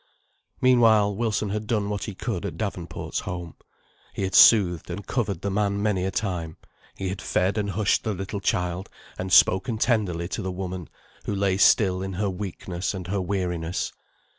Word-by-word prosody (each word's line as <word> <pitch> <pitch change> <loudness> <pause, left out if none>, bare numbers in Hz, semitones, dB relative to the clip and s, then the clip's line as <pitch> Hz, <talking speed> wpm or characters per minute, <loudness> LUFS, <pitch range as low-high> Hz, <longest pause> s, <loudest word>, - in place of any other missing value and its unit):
Meanwhile, 115 -5 +5
Wilson 110 -1 -1
had 105 +1 -3
done 105 -3 0
what 105 -1 -3
he 105 - -6
could - - -3
at - - -5
Davenport's 90 -6 -4
home. 90 -3 -6 0.6
He - - -2
had 95 0 -2
soothed, 90 -8 +6
and 95 +3 -5
covered 105 -8 -2
the 100 - -2
man 100 0 0
many 100 -3 0
a - - 0
time; 90 -4 -3 0.4
he 95 - -3
had 95 +1 -5
fed 95 +2 0
and 105 -2 -1
hushed 100 +1 +1
the 110 -3 -2
little 95 +2 -4
child, 90 -1 -1 0.3
and 95 0 -4
spoken 95 +6 +5
tenderly 100 -8 0
to 110 - -3
the 95 -1 -3
woman, 90 -2 -5 0.4
who 105 - -2
lay 100 -1 +1
still 95 -1 +4
in 95 0 -4
her 100 +1 -1
weakness 90 -1 -4
and 95 -2 -6
her 100 0 0
weariness. 90 -3 -2
95 Hz, 180 wpm, -25 LUFS, 90-105 Hz, 0.6 s, soothed